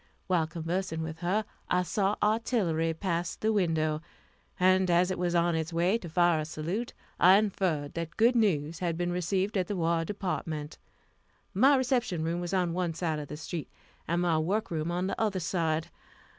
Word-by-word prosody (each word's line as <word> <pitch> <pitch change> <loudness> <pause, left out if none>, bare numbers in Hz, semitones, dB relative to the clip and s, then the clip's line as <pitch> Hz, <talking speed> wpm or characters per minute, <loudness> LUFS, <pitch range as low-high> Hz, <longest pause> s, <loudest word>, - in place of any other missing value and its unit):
While 175 -4 +1
conversing 165 0 -3
with 160 0 -6
her, 190 +5 0 0.2
I 180 0 +2
saw 200 +2 0
artillery 210 -7 +1
pass 170 0 -2
the 220 0 0
window; 160 -5 +1 0.6
and 185 0 +4
as 175 +2 +3
it 185 - -3
was 175 -1 0
on 170 0 +3
its 160 0 -2
way 175 +6 +2
to 175 - -8
fire 175 -1 +3
a 155 - -2
salute, 170 +10 -4 0.3
I 185 +2 +8
inferred 185 -8 0
that 165 0 -5
good 235 +3 +4
news 170 -8 +1
had 170 -3 -1
been 175 0 -1
received 185 +3 0
at 180 - -1
the 205 - -2
War 165 -1 +1
Department. 165 -5 -4 0.7
My 265 +9 +5
reception 245 - 0
room 170 +2 -1
was 175 0 -4
on 180 -3 +1
one 175 -2 -1
side 160 -3 -1
of 145 - -6
the 150 - -7
street, 160 +1 -5 0.4
and 170 +2 +1
my 165 -3 +2
work 200 +7 -1
room 160 0 -2
on 175 +1 -1
the 195 - -3
other 205 -4 +1
side. 165 -2 -1
175 Hz, 185 wpm, -29 LUFS, 165-190 Hz, 0.7 s, I